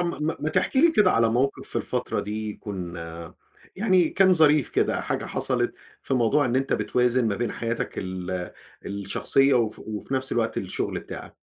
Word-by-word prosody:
آمم 170 -3 -2
ما 160 - -1
ما 155 - 0
تحكي 185 +10 +1
لي 335 +1 +6
كده 205 -7 +5
على 115 0 +3
موقِف 130 +4 0
في - - -4
الفترة - - -2
دي 105 +1 -4
يكون 90 -5 -6 0.8
يعني 185 -5 +3
كان 190 -1 +4
ظريف 150 -5 +4
كده، - - +1
حاجة - - -2
حصلت - - -1 0.3
في 135 - -1
موضوع 130 +4 +3
إن 125 +1 0
أنت 135 0 0
بتوازن 125 -1 +1
ما 100 - -1
بين 120 0 -2
حياتك 115 0 -3
ال 95 -1 -4 0.4
الشخصية 100 +7 +1
وف 110 -3 +1
وفي 110 +5 -5
نفس 130 0 -1
الوقت 115 -1 0
الشغل 95 -1 -3
بتاعك؟ - - -9
120 Hz, 175 wpm, -25 LUFS, 105-150 Hz, 0.8 s, لي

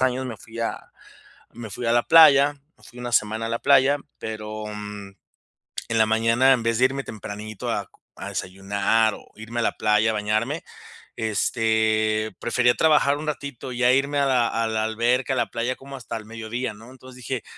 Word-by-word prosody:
años 130 0 +1
me 120 -4 -6
fui 115 0 -12
a 115 - -2 0.8
me 120 -2 -8
fui 115 +4 -6
a 115 - +2
la 120 0 +4
playa, 145 -3 +7 0.2
me - - -24
fui 120 - -15
1 120 0 -5
semana 110 0 +1
a - - -3
la 115 - -2
playa, 140 +1 +4 0.2
pero, 110 -1 -6
mm, 105 -1 -7 0.8
en 115 - 0
la 110 - +6
mañana, 115 +4 +3
en 120 -3 -1
vez 115 0 0
de 130 - +5
irme 135 +1 -1
tempranito 105 0 -7
a - - -2 0.3
a - - -7
desayunar 100 +3 0
o - - -16
irme 115 +2 -6
a - - 0
la - - +1
playa, 105 +1 +2
a - - -3
bañarme, 110 +8 -1 0.5
este, 110 -1 0
prefería 120 0 +2
trabajar 150 -2 +3
un 155 - -6
ratito, 140 -4 -5
ya 125 0 +3
irme 140 +2 +1
a 140 - +2
la 125 -3 +2
a 115 0 -1
la 110 -1 -1
alberca, 120 +5 0
a - - -1
la - - +1
playa 120 +2 -2
como 135 0 -10
hasta 125 - -6
el 110 - -10
mediodía, 115 +2 -5
¿no? 115 +4 -14
Entonces 130 -1 -14
dije: 125 0 -4
115 Hz, 200 wpm, -23 LUFS, 110-130 Hz, 0.8 s, playa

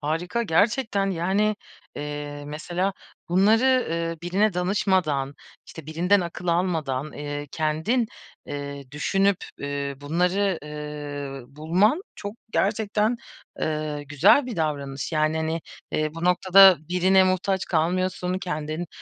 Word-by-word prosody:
Harika 170 +10 -1
gerçekten, 205 +1 +1
yani, 195 +4 +1 0.4
eee, 145 0 -5
mesela, 175 +6 -2 0.4
bunları, 225 +8 +4
ııı, 165 0 -2
birine 195 +3 +1
danışmadan, 180 -7 +1 0.3
işte, 160 -3 -11
birinden 175 +6 +2
akıl 175 0 -6
almadan, 160 -6 0
eee, 145 0 -5
kendin, 160 - 0 0.4
eee, 140 -2 -6
düşünüp, 195 +6 +2 0.2
ü 140 0 -3
bunları, 180 +5 +1
ııı, 145 -3 -6
bulman 185 - +2
çok 205 +1 -6 0.2
gerçekten, 215 +2 +1 0.4
eee, 155 -1 -2
güzel 175 - +5
bir 245 - -5
davranış. 145 -2 -2
Yani, 155 0 +1
hani, 160 +1 -1 0.3
eee, 155 0 -1
bu 165 +1 -5
noktada 185 0 +7
birine 185 +2 +4
muhtaç 185 +1 0
kalmıyorsun, 180 +2 0
kendin 155 -2 -4
170 Hz, 115 wpm, -25 LUFS, 150-195 Hz, 0.4 s, noktada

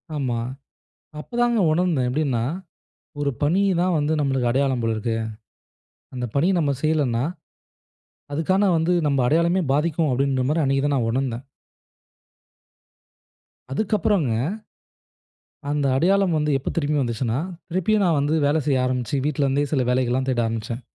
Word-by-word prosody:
ஆமா, 130 -5 -1 0.8
அப்போ 235 - -12
தாங்க 240 -2 +2
உணர்ந்தேன் 165 -7 +1
எப்படின்னா, 130 -3 0 0.8
"ஒரு 145 -1 +1
பணி 175 +7 +2 0.2
தான் 180 -1 +2
வந்து 150 +2 0
நம்மளுக்கு 135 -4 +1
அடையாளம் 130 -1 +1
போல 115 -1 0
இருக்கு. 115 +1 -2 1.0
அந்த 125 -1 -3
பணிய 170 +7 +3
நாம் 140 -4 0
செய்யலன்னா, 140 -6 +1 1.1
அதுக்கான 190 +6 +2
வந்து 165 +2 +1 0.2
நம்ம 140 -2 +1
அடையாளமே 170 +6 +2
பாதிக்கும்." 155 0 +1
அப்படிங்கிற 130 0 +1
மாரி 155 +1 +1
அன்னைக்கு 135 0 +1
தான் 145 - +1
நான் 115 -3 0
உணர்ந்தேன். 130 0 -2 2.3
அதுக்கப்புறங்க. 195 - +1 1.4
அந்த 145 -1 0
அடையாளம் 185 +3 +2
வந்து 150 0 0
எப்போ 135 - -4
திரும்பி 150 -2 +1
வந்துச்சுன்னா, 120 0 -1 0.3
திருப்பியும் 195 +4 +1
நான் 165 -4 +2
வந்து 145 +3 +1
வேல 150 - +2
செய்ய 130 -3 +2
ஆரம்பிச்சு, 125 +1 -1
வீட்ல 145 -1 0
இருந்தே 140 +2 +1
சில 130 - +2
வேலைகள்லாம் 130 +1 +1
தேட 120 -2 +1
ஆரம்பிச்சேன். 115 +2 -4
140 Hz, 135 wpm, -23 LUFS, 130-165 Hz, 2.3 s, பணிய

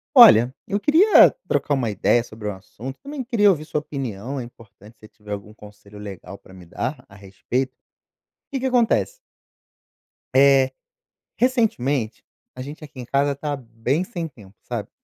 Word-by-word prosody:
Olha, 130 - +8
eu 200 - 0
queria 320 - +6 0.2
trocar 145 - 0
uma 130 -5 0
ideia 105 +4 +2
sobre 110 -2 -7
um - - -4
assunto, 115 +7 -10
também 280 -1 -6
queria 225 -4 +3
ouvir 160 -6 +1
sua 155 -1 -2
opinião, 135 -4 -5
é - - -5
importante 110 -2 -16
se 110 - -14
tiver 105 -1 -14
algum 105 +1 -6
conselho 105 -1 -15
legal 100 -2 -9
pra 95 - -18
me 90 -2 -13
dar 85 - -5
a 100 - -17
respeito. 125 +7 -4 0.7
Que 275 - -3
que - - -2
acontece 255 - +2 1.2
eh, 135 -1 +5 0.7
recentemente, 145 - 0 0.3
a 130 - -7
gente 145 +4 -9
aqui 145 -3 -12
em 125 - -6
casa 140 +2 +1
tá 145 +1 -3
bem 125 +5 -2
sem 175 -5 -5
tempo, 105 -9 -17
sabe? - - -5
130 Hz, 165 wpm, -22 LUFS, 105-160 Hz, 1.2 s, Olha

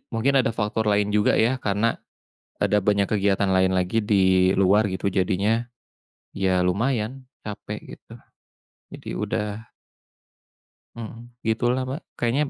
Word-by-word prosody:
mungkin 130 +5 +1
ada 115 - 0
faktor 110 +1 -1
lain 105 0 +2
juga 105 -1 +3
ya 120 +4 +2
karena 105 +3 0 0.6
ada 105 +1 +2
banyak 100 -1 +2
kegiatan 100 -1 +1
lain 95 0 +3
lagi 95 +5 +1
di 95 -2 +3
luar 100 +2 +4
gitu, 95 +1 -2
jadinya 100 +6 0 0.7
iya 95 -2 +1
lumayan 120 +6 -1 0.2
capek 105 -1 -7
gitu, - - -24 0.8
jadi - - -9
udah 105 - -2 1.5
Mhm, 115 +1 -9 0.2
gitulah, 120 +3 +1
Pak. 135 +4 -4 0.2
Kayaknya 125 +5 +1
105 Hz, 125 wpm, -24 LUFS, 95-115 Hz, 1.5 s, luar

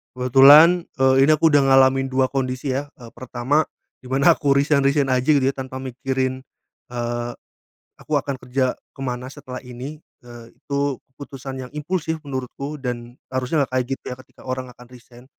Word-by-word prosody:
Kebetulan, 145 +7 +7
eee, 130 0 +5
ini 155 - +4
aku 160 +1 +3
udah 145 - +5
ngalamin 135 0 +4
2 130 0 +1
kondisi, 130 0 -2
ya. 140 +2 -2
Eee, 120 -2 -13
pertama 130 +4 -1 0.3
di 125 - -14
mana 140 +6 +4
aku 140 -1 +2
resign 140 0 +2
resign 140 -1 +2
aja, 130 0 +1
gitu, 140 - +2
ya, 135 +1 +1
tanpa 130 0 -6
mikirin, 130 0 -3 0.4
eee, 120 0 -3 0.7
aku 155 - -11
akan 140 -1 -2
kerja 130 0 -1 0.2
ke - - -14
mana 125 0 -4
setelah 130 -3 -8
ini, 125 +5 -8 0.2
eee, 120 -1 -13
itu 140 -2 -2 0.2
keputusan 135 -1 -8
yang - - -16
impulsif 160 +1 -3
menurutku, 140 +2 -6
dan 120 -1 -5 0.2
harusnya 130 +3 0
nggak - - -14
kayak 130 -1 +1
gitu, - - -49
ya, - - -20
ketika - - -20
orang 130 0 -4
akan 125 - -16
resign. 125 0 -16
130 Hz, 175 wpm, -22 LUFS, 125-140 Hz, 0.7 s, Kebetulan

